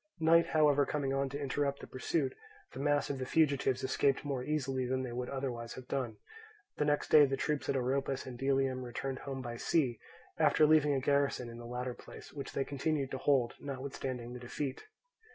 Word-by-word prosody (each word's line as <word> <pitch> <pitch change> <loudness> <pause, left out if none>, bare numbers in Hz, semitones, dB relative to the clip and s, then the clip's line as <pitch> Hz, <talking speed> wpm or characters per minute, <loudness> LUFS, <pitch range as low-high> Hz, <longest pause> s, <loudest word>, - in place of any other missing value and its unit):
Night 165 +1 +5
however 150 -2 +4
coming 140 -1 -1
on 135 0 0
to 140 +2 -5
interrupt 140 0 -1
the - - -8
pursuit, 135 +1 -1 0.4
the - - -7
mass 145 0 +1
of 135 - -4
the 130 - -2
fugitives 140 -5 +2
escaped 135 +2 +1
more 135 -3 -2
easily 135 -3 -1
than 130 +1 0
they 125 - -4
would 125 +1 -3
otherwise 125 -4 -4
have 130 -1 -10
done. 125 -6 -2 0.6
The 150 - +1
next 145 0 +1
day 150 -2 +8
the 135 0 -1
troops 150 +1 -1
at - - +2
Oropus 135 +1 0
and 130 - -7
Delium 135 0 +1
returned 130 +2 -4
home 135 -2 -5
by 120 -1 -5
sea, 125 -5 +1 0.4
after 155 - +5
leaving 150 -2 +5
a - - +2
garrison 140 -2 +1
in 115 - -9
the 120 - -8
latter 125 +1 -3
place, - - -12
which 140 -2 -6
they 135 - 0
continued 140 0 -1
to 130 - -3
hold 130 -4 +2
notwithstanding 130 -3 -5
the 125 - -7
defeat. 130 +2 -4
135 Hz, 200 wpm, -33 LUFS, 130-145 Hz, 0.6 s, day